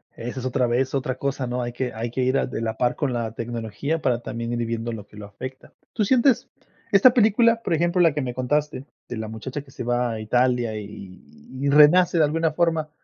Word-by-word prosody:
Esa 120 +3 -6
es 130 - -6
otra 125 -1 +1
vez, 125 +2 0
otra 130 -1 -1
cosa, 135 -1 -2
¿no? 125 +1 -2
Hay 120 0 -3
que 125 0 -3
hay 115 +1 -4
que 130 - -2
ir 130 +2 +2
a - - +1
de 125 - -5
la 110 -1 -3
par 120 -1 +1
con 140 -4 -1
la 115 -2 -2
tecnología 115 +7 -3
para 125 -4 +1
también 115 0 -5
ir 120 -1 -1
viendo 115 0 -3
lo 110 -3 -7
que 105 - -16
lo 105 - -8
afecta. 130 +6 -9 0.2
¿Tú 220 - 0
sientes 255 +4 +3 0.4
esta 210 +5 +7
película, 230 0 +4
por 185 - -1
ejemplo, 175 +2 +2
la 165 -3 +4
que 150 - -2
me 125 -2 -3
contaste, 135 +2 -1 0.2
de 120 - -6
la 110 0 -4
muchacha 125 +6 -6
que 135 -1 -18
se - - -7
va 120 0 0
a 110 - -4
Italia 120 0 +1
y 105 -1 -5
y 95 - -10
y - - +2
renace 150 +5 +6
de 160 - +5
alguna 160 +2 +1
forma? 160 -1 0
130 Hz, 240 wpm, -23 LUFS, 115-150 Hz, 0.4 s, esta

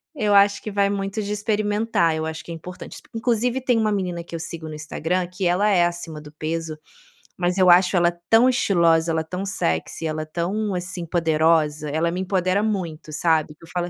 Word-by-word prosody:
eu 210 -7 +1
acho 200 0 +5
que 215 - -5
vai 200 0 +2
muito 195 +1 -2
de 205 - -4
experimentar, 210 -4 0
eu 160 0 -2
acho 160 0 -5
que - - -9
é - - -4
importante, 180 +3 -9
exp - - -13
inclusive, 240 +2 0
tem 245 -2 +2
uma 215 -1 +1
menina 180 -4 -2
que 170 - -15
eu - - -4
sigo 165 -1 -7
no - - -7
Instagram 165 +4 -2
que 180 +1 -4
ela 190 +4 +2
é 180 -4 +4
acima 170 -2 -4
do 150 0 -12
peso, 160 +1 -4 0.6
mas 180 +1 0
eu 185 -1 +5
acho 180 +2 +5
ela 170 0 +4 0.2
tão 230 +3 +6
estilosa, 170 -9 +3
ela 160 0 0
é - - -5
tão 180 +4 -4
sexy, 80 - -2
e - - +1
ela 155 0 -3
é - - -9
tão, 190 +6 -2
assim, 180 -1 -5
poderosa. 160 -2 +1
Ela 160 +3 0
me 180 - -3
empodera 190 +1 +1
muito, 175 -8 -3
sabe? 155 -1 +1
Que 155 - -23
eu - - -18
falo 175 0 -2
175 Hz, 225 wpm, -23 LUFS, 160-200 Hz, 0.6 s, tão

